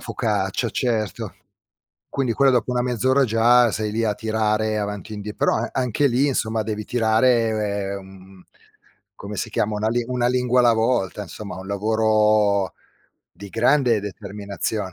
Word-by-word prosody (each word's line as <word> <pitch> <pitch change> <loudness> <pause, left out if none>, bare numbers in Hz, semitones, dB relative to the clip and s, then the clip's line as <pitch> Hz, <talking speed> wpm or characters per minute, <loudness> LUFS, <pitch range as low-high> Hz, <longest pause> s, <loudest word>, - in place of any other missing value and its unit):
focaccia, - - -2
certo. 110 -4 -2 0.7
Quindi 130 -4 -1
quello 135 +4 +4
dopo 125 -1 +1
1 125 - 0
mezz'ora 130 +3 +2
già 120 +1 +4
sei 105 0 -2
lì 115 +1 0
a 105 -2 0
tirare 110 0 0
avanti 105 +1 -5
e - - -5
indie 105 0 -6
però - - +1
a - - -2
anche 130 +2 +1
lì, 135 +3 +2
insomma, 110 -4 -1
devi 105 -1 -4
tirare 110 -4 +1
mhmm, 95 -1 -15 0.7
come 100 0 -8
si - - -3
chiama? 105 0 -1
Una 105 +1 0
li 120 +2 0
una 125 -1 0
lingua 125 0 +2
alla 120 -1 +5
volta, 110 -4 0
insomma, 100 -2 -8
un 95 - -9
lavoro 105 -1 +2 0.6
di 100 - -11
grande 125 +3 +2
determinazione. 100 0 -5
110 Hz, 155 wpm, -22 LUFS, 105-120 Hz, 0.7 s, alla